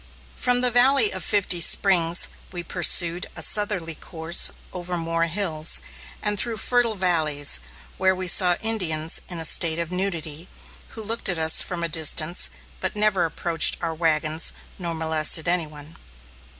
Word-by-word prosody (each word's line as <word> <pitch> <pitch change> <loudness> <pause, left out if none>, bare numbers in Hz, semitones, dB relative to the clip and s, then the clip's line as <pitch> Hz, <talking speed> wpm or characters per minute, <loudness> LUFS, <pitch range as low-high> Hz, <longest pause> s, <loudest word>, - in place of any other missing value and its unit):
From 245 -1 0
the 250 -1 +2
Valley 245 -1 +4
of 185 - -5
Fifty 190 -4 0
Springs, 175 -2 +2 0.2
we 175 -2 -7
pursued 175 0 +1
a - - 0
southerly 205 -6 +2
course 160 +1 -1 0.2
over 180 0 -4
more 165 0 -2
hills, 165 -3 0 0.4
and 210 -1 -2
through 235 -2 0
fertile 240 0 +1
valleys, 155 - +1 0.4
where 190 0 +2
we 185 0 -3
saw 180 0 +5
Indians 165 -8 0
in 175 - -6
a 165 - 0
state 160 0 +3
of 170 0 -5
nudity, 170 -3 -3 0.5
who 220 - -7
looked 225 0 0
at 180 - 0
us 160 0 +5
from 175 -2 -5
a - - -1
distance, 160 +1 0 0.3
but 190 - -4
never 210 -4 +1
approached 165 0 +1
our 165 -1 -4
wagons, 155 -1 0 0.3
nor 170 -2 -3
molested 160 0 +1
any 175 -2 +2
one. 150 +1 -15
175 Hz, 155 wpm, -22 LUFS, 160-195 Hz, 0.5 s, saw